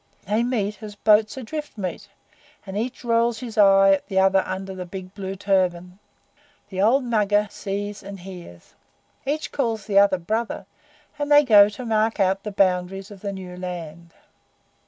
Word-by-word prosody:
They 210 +3 +1
meet 210 -5 -2
as 210 -1 -8
boats 215 +2 +3
adrift 295 +2 -6
meet, 185 -4 -5 0.6
and 190 -1 -7
each 240 +5 -4
rolls 230 0 +2
his 230 -1 -7
eye 195 -1 +6
at 195 - +1
the 190 - -3
other 190 0 +4
under 190 0 -5
the 185 -1 -6
big 185 0 -8
blue 195 -1 -5
turban. 185 -2 0 0.7
The 190 -1 -3
old 250 +7 +4
Mugger 210 -3 +1
sees 205 0 -5
and 195 -1 -9
hears. 175 - -12 0.5
Each 300 +2 -2
calls 230 -6 -2
the 200 -2 +4
other 200 -2 +4
'Brother,' 220 +6 -3 0.5
and 290 0 -2
they 290 0 +8
go 210 -6 +7
to 210 +4 -8
mark 220 0 +1
out 195 0 +2
the 210 - -6
boundaries 190 +1 0
of 200 -2 -12
the 200 - -3
new 185 -2 -8
land. 170 -2 -8
200 Hz, 170 wpm, -23 LUFS, 190-220 Hz, 0.7 s, they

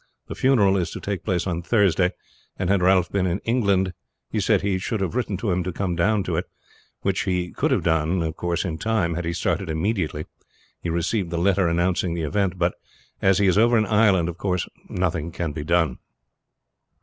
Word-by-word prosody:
The - - -3
funeral 105 -8 +3
is 90 - -1
to - - -5
take 100 -3 -4
place 90 -5 0
on 85 -3 -2
Thursday, 95 -2 +2 0.4
and 90 0 0
had 100 -2 +3
Ralph 90 -1 +3
been 95 -2 +1
in 90 +1 0
England 100 -6 +1 0.4
he - - 0
said - - +2
that - - -4
he 95 -2 +1
should 110 +3 -2
have 95 -3 -2
written 120 -6 -1
to 100 +1 -1
him 90 +1 +1
to 90 - -3
come 90 0 -2
down 100 +4 +2
to - - -2
it, - - -1 0.6
which 95 -1 0
he 90 -2 -1
could - - 0
have - - +1
done 80 0 +1 0.3
in 80 -3 -3
time 110 -6 0
had 85 +1 -3
he 85 - -1
started 90 +1 -1
immediately 80 -2 -1 0.6
he 85 - -3
received 85 +3 -1
the 85 - -3
letter 95 +1 +2
announcing 85 +1 0
the 85 - -2
event; 95 +5 0
but 85 0 +1 0.5
as 95 -1 +4
he 100 - +3
is 95 +2 +4
over 120 +1 +5
in 110 - +3
Ireland, 100 -5 +3
of 85 0 -6
course 90 -3 -1 0.2
nothing 85 -3 -1
can 85 -2 -3
be 75 +1 -5
done. 80 -4 +1
90 Hz, 210 wpm, -23 LUFS, 85-100 Hz, 0.6 s, over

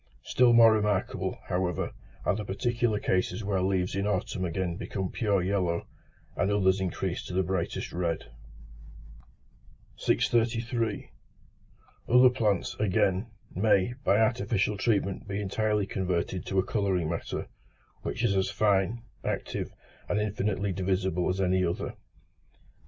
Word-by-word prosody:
Still 125 -1 +4
more 115 -1 +8
remarkable, 105 -3 0
however, 90 -2 -1 0.3
are - - +2
the 105 - -3
particular 115 +3 0
cases 95 +4 0
where 100 -2 0
leaves 95 -1 0
in 100 +1 0
autumn 95 -2 -1
again 90 0 -2
become 95 +1 -4
pure 100 -5 +1
yellow, 90 -3 0 0.5
and 100 - +1
others 95 -2 +3
increase 95 -1 -2
to 90 - -6
the 95 - +3
brightest 95 -1 -2
red. 85 -7 -2 1.7
633. 115 -1 0 1.0
Other 125 +1 +7
plants, 105 -6 0
again, 95 0 +1 0.3
may, 100 +3 +3
by 100 - +4
artificial 110 -2 +1
treatment 100 -2 0
be 100 0 -3
entirely 105 +1 0
converted 90 -2 -2
to 95 - -2
a 95 - +3
colouring 95 -6 0
matter, 85 +1 -3 0.6
which - - -3
is 100 - +2
as 95 0 +1
fine, 105 +2 +1 0.2
active, - - -3 0.4
and 105 - +1
infinitely 100 -1 -1
divisible 95 -1 0
as 90 +1 -1
any 95 0 +2
other. 85 -1 -2
100 Hz, 130 wpm, -28 LUFS, 95-105 Hz, 1.7 s, more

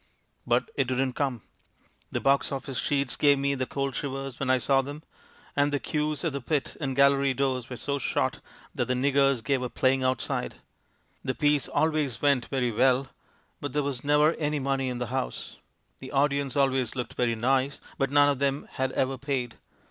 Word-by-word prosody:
But - - +1
it - - 0
didn't 130 0 0
come. 130 -6 -2 0.7
The - - -1
box 140 0 +2
office 135 -1 -4
sheets 140 -2 0
gave 145 -1 +4
me 140 +1 +1
the 130 -2 -2
cold 140 -1 -2
shivers 135 -2 -4
when 135 - -1
I 130 - +5
saw 135 +2 +3
them, 145 +3 -8 0.5
and 145 0 +2
the 145 - 0
queues 150 +2 -2
at 165 -4 -1
the 140 - -3
pit 145 +2 -1
and 135 -3 -2
gallery 140 0 +4
doors 130 -2 -1
were 125 - -6
so 140 +2 -2
short - - -1 0.3
that - - -1
the 125 - 0
'niggers' 135 -1 +2
gave 135 +3 +1
up 125 - -5
playing 130 0 +2
outside. 130 -2 -1 0.7
The 130 - -2
piece 145 +1 +2
64 - - -1
THE - - +5
MAN 160 - 0
WHO 155 - +1
UNDERSTOOD 130 -7 -2
WOMEN 145 -1 +6
always 130 - -2
went - - -13
very 125 -3 +1
well, 130 +3 +3 0.5
but 145 -3 -5
there 150 - +1
was 135 -3 -3
never 150 +2 +4
any 150 -1 0
money 135 -1 0
in 125 - -3
the 125 - -2
house; 130 -1 -4 0.4
the 130 - -9
audience 140 -1 +1
always 135 -3 +1
looked 125 -3 -4
very 120 -2 0
nice, 130 +4 +1 0.2
but 135 - +1
none 145 +1 +5
of 140 -2 0
them 140 0 0
had 130 -1 -1
ever 130 0 0
paid. 130 -4 -3
135 Hz, 210 wpm, -27 LUFS, 130-140 Hz, 0.7 s, WOMEN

